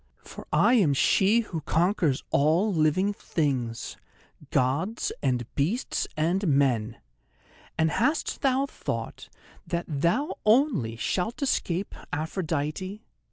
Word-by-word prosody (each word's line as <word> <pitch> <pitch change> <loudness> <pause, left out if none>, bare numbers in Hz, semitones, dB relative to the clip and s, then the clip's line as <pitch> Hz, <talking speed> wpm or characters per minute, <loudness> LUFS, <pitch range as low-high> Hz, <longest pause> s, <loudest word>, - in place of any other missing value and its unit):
For - - -11
I 240 - +4
am 180 - +4
she 200 - +4
who 170 -8 -5
conquers 165 -4 +1
all 165 +9 +3
things 185 +6 +1
living: 130 -7 0 0.7
Gods 145 - 0
and 125 -3 0
beasts 180 - -1
and 175 +5 +1
men. 125 -6 +1 0.8
And 160 0 +2
hast 295 +7 0
thou 270 0 +2
thought - - -5 0.4
that 170 0 -2
thou 170 - 0
only 215 - +3
shalt 195 - -2
escape 195 -8 -1 0.2
Aphrodite? 160 +5 -3
170 Hz, 110 wpm, -27 LUFS, 145-210 Hz, 0.8 s, I